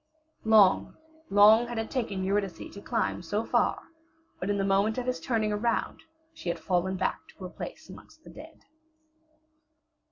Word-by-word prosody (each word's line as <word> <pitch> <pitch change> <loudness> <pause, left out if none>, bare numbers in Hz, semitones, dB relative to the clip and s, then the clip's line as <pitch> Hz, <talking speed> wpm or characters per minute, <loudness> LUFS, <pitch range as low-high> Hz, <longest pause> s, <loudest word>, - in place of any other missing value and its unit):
Long, 215 -4 +4 0.3
long 215 +4 +6
had 240 -1 -6
it 225 0 -3
taken 215 -7 -2
Eurydice 195 -3 -1 0.2
to 200 - -10
climb - - -2
so 205 +6 -2
far, - - +1 0.6
but 185 - -3
in 205 - +1
the 195 - 0
moment 200 +3 +1
of 250 - -2
his 255 0 -2
turning 220 -3 -1
around 230 +3 -1 0.3
she 180 - -6
had 170 - -2
fallen 185 +2 -1
back 185 - -1
to - - -14
her 180 - -6
place - - -8
amongst - - -15
the - - -13
dead. - - -13
205 Hz, 165 wpm, -28 LUFS, 190-225 Hz, 0.6 s, long